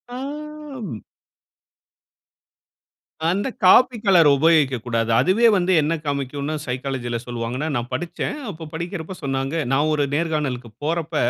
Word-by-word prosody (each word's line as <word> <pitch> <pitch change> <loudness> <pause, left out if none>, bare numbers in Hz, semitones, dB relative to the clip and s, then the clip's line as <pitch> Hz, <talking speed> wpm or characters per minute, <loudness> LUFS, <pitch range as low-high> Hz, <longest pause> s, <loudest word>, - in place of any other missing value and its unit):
ஆ, - - -5 0.7
ம். 120 - -5 2.3
அந்த 195 +7 0 0.2
coffee 240 +6 +6
colour 180 -6 +6
உபயோகிக்கக்கூடாது. 130 -7 +2
அதுவே 220 +6 +4
வந்து 185 0 +1
என்ன 150 +3 0
காமிக்கும்னா 140 +1 -2
சைக்காலஜில 125 -1 -3
சொல்லுவாங்கன்னா, 120 +4 -3
நான் 120 0 -2
படிச்சேன். 175 - -3
அப்போ 165 -4 -7
படிக்கிறப்போ 170 +2 -5
சொன்னாங்க 135 +3 -1
நான் 145 +3 +2
ஒரு 150 -1 +1
நேர்காணலுக்குப் 135 -8 -2
போறப்ப, 165 0 -2
150 Hz, 110 wpm, -22 LUFS, 130-170 Hz, 2.3 s, coffee